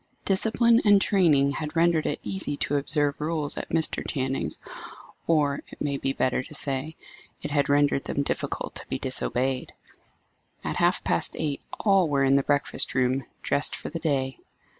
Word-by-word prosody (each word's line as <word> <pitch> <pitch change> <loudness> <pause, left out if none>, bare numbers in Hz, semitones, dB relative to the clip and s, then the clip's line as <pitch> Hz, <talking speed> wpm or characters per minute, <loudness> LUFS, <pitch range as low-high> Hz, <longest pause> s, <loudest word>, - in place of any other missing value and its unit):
Discipline 230 +4 +4
and 205 -2 +6
training 155 -9 +3
had 150 +2 -5
rendered 165 -1 +2
it - - -2
easy 190 -7 -3
to 145 - 0
observe 145 0 -1
rules 155 -1 -2
at - - -5
Mr. 160 -1 0
Channing's; 130 - -1 0.7
or, 150 -4 +2
it - - -14
may 140 -1 -1
be 135 - -1
better 130 -2 0
to 130 - -12
say, 140 +3 0 0.5
it 150 - -3
had 145 -1 +1
rendered 145 -1 +2
them 140 - -1
difficult - - -3
to - - -6
be 65 - -3
disobeyed. 130 0 -1 0.9
At - - -3
half - - +2
past - - +2
eight 145 -3 -2 0.2
all 195 -5 +3
were 140 -1 +2
in 135 0 +4
the 140 - +4
breakfast 145 -1 0
room, 130 0 +1 0.2
dressed 145 - +2
for - - -6
the 165 - -4
day. 135 -4 -1
145 Hz, 170 wpm, -26 LUFS, 135-165 Hz, 0.9 s, and